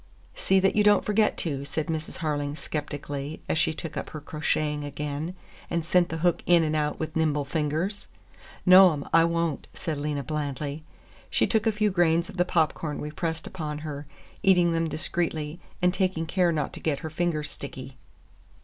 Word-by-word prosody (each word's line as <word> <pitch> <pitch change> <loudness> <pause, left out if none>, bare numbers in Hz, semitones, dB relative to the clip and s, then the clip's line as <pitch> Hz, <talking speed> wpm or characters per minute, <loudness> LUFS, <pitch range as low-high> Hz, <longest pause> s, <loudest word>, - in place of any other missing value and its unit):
"See 190 0 +3
that 195 0 +2
you 210 - +4
don't 205 -1 +5
forget 210 0 +2
to," 140 -5 -2
said 150 +2 -2
Mrs. 160 0 -4
Harling 145 -1 -1
skeptically, 145 -1 -4
as 160 - +1
she - - +3
took 160 +1 -7
up - - -4
her 155 - -6
crocheting 150 0 -1
again 150 +4 -4 0.3
and 170 -1 -1
sent 175 +1 +3
the 165 - -3
hook 175 - +3
in 175 -2 +6
and 155 0 0
out 150 -1 0
with 160 0 -4
nimble 150 -3 +1
fingers. 160 +8 -2 0.6
"No, 185 -1 +9
'm, 145 -1 -5
I 165 0 +7
won't," 170 -3 -1
said 155 -3 -3
Lena 145 -1 -2
blandly. 145 +1 -3 0.5
She - - +2
took 220 -1 +1
a - - +5
few 210 0 +1
grains 170 -2 +2
of - - -10
the 180 - +3
popcorn 160 -3 0
we 150 - -4
pressed 160 0 -3
upon 155 -5 -4
her, 145 -1 -6 0.3
eating 180 -3 +5
them 165 0 0
discreetly 155 0 -2 0.2
and 180 0 +4
taking 185 -4 0
care 175 +1 +2
not 150 -3 -1
to - - -7
get 150 -3 -1
her 160 - -5
fingers 160 -2 -1
sticky. 130 -2 -8
160 Hz, 185 wpm, -27 LUFS, 150-175 Hz, 0.6 s, No